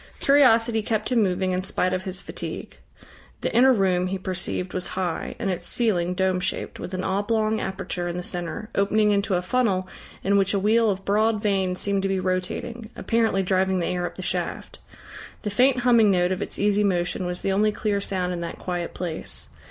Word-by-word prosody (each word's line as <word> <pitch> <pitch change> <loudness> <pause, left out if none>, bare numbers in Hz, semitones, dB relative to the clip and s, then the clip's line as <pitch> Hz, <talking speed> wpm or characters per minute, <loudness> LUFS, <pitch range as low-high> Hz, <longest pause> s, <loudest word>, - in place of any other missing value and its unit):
Curiosity 235 -5 +4
kept 215 +2 -2
him 240 -2 +4
moving 185 -1 +1
in 185 0 -1
spite 185 -1 0
of 185 0 -2
his 185 -1 -3
fatigue. - - -7 0.6
The - - -2
inner 260 +3 +7
room, 185 -5 +2
he 195 +1 -2
perceived, 185 -1 -4
was 185 - -2
high, 180 -3 -2
and 195 -4 -1
its 180 - -5
ceiling 180 -7 +1
dome 190 0 +1
shaped, 180 - -3
with 185 - -5
an 185 - -3
oblong 215 +3 0
aperture 190 -2 -3
in 175 0 -3
the 180 - -4
centre, 175 +5 -5
opening 210 +1 +3
into 200 -1 +1
a 180 - 0
funnel 190 -3 +1 0.4
in 200 +1 +3
which 195 +1 +2
a - - +2
wheel 220 +3 +3
of 195 -1 -2
broad 215 +2 +2
vanes 190 -3 0
seemed 200 -1 0
to 195 - -1
be 190 -1 0
rotating, 190 +5 -3
apparently 225 -4 +1
driving 190 0 +1
the 175 - 0
air 180 -1 -1
up - - -10
the - - -7
shaft. - - -3 0.6
The 210 - -2
faint 250 +4 +3
humming 235 -3 +5
note 180 -1 +2
of 185 - -2
its - - -4
easy 205 0 +2
motion 180 -1 0
was 180 0 -4
the 195 - +1
only 210 +2 +3
clear 205 -1 -1
sound 180 -2 -2
in 175 - -4
that 170 0 -5
quiet 175 -2 -4
place. 170 -3 -5
195 Hz, 205 wpm, -24 LUFS, 185-215 Hz, 0.6 s, inner